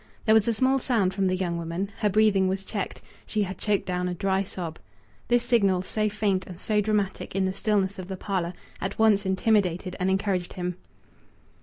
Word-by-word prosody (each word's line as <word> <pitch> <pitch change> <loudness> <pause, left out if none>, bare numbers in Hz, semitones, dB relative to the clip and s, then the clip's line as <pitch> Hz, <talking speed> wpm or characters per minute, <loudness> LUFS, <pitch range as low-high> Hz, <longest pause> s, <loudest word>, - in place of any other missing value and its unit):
There 220 - +5
was 220 -1 +4
a 230 - +3
small 260 +4 +3
sound 220 -8 +1
from 195 0 +1
the 185 - +1
young 175 -2 -2
woman; 170 +4 -3
her 210 - +2
breathing 205 -2 +4
was 190 +1 -1
checked; 200 0 -4 0.2
she 215 -1 -1
had 190 0 -5
choked 210 -2 +1
down 180 0 -1
a 180 - -2
dry 195 +1 +1
sob. 175 -4 -6 0.5
This 240 0 +3
signal, 200 -7 +3
so 215 +2 0
faint 200 -3 0
and 180 -1 -9
so 210 +1 +1
dramatic 205 -3 -1
in 195 -1 +2
the 190 - -1
stillness 200 -1 0
of 185 - -6
the 190 -1 -5
parlour, 185 -3 -2 0.3
at 190 +1 -3
once 210 -3 +4
intimidated 190 -2 +1
and 185 +1 +1
encouraged 190 -2 0
him. 180 -1 -3
195 Hz, 200 wpm, -26 LUFS, 185-210 Hz, 0.5 s, There